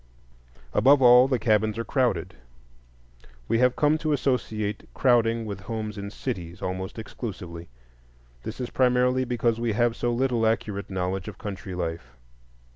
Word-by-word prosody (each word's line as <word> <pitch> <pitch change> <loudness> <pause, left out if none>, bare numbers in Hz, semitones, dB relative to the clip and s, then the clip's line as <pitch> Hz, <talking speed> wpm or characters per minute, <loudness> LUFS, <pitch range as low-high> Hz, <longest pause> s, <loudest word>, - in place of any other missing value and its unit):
Above 140 +1 +5
all, 125 0 +7
the 130 -2 +1
cabins 110 -1 +1
are 115 - -2
crowded. 120 - 0 1.1
We 115 - +1
have 125 0 +3
come 150 +1 +2
to 155 -2 0
associate 110 -7 -2
crowding 115 -3 +2
with 100 -2 -5
homes 110 +1 -5
in 100 -1 -6
cities 90 -7 -5
almost 95 +2 -4
exclusively. 90 -7 -7 0.7
This 110 - -7
is 125 - -4
primarily 125 0 +2
because 120 -2 0
we 115 -2 0
have 120 +1 +1
so 120 - -1
little 120 -2 +1
accurate 105 -2 -2
knowledge 95 0 -2
of - - -7
country 95 -3 -6
life. 80 -8 -5
115 Hz, 145 wpm, -26 LUFS, 100-125 Hz, 1.1 s, all